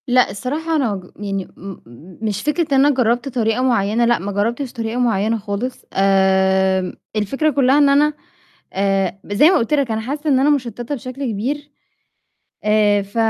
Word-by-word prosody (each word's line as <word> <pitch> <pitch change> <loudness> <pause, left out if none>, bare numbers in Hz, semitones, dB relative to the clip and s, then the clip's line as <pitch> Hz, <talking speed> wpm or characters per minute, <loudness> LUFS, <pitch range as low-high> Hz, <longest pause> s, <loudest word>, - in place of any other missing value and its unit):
لأ، 250 0 +3
الصراحة 300 +10 -3
أنا 255 -8 +1
أجو 185 -2 -8
يعني، 195 -2 -4
إمم، 195 0 -9 0.4
مش 210 -2 -2
فكرة 300 +1 0
إن 270 +1 +5
أنا 290 -2 +3
جربت 245 +1 +1
طريقة 230 -2 0
مُعينة، 230 -2 +2
لأ، 240 0 +2
ما 200 +3 -4
جربتش 235 +6 -2
طريقة 230 0 -3
مُعينة 225 -2 +1
خالص. 215 +4 -5
آمم، 190 -1 +2 0.2
الفكرة 270 +9 0
كلها 270 -1 +3
إن 290 -1 +5
أنا، 295 +2 +3 0.6
آآ، 195 -1 0
زي 205 +11 +4
ما 375 - +4
قُلت 230 +5 -1
لك 280 -5 +1
أنا 220 0 -1
حاسة 290 +6 -3
إن 265 -2 +3
أنا 280 +2 +3
مُشتتة 245 -2 -2
بشكل 255 +2 -6
كبير. 280 +8 -4 0.9
آآ، 210 -1 +3
ف 200 +2 -13
235 Hz, 170 wpm, -19 LUFS, 200-275 Hz, 0.9 s, إن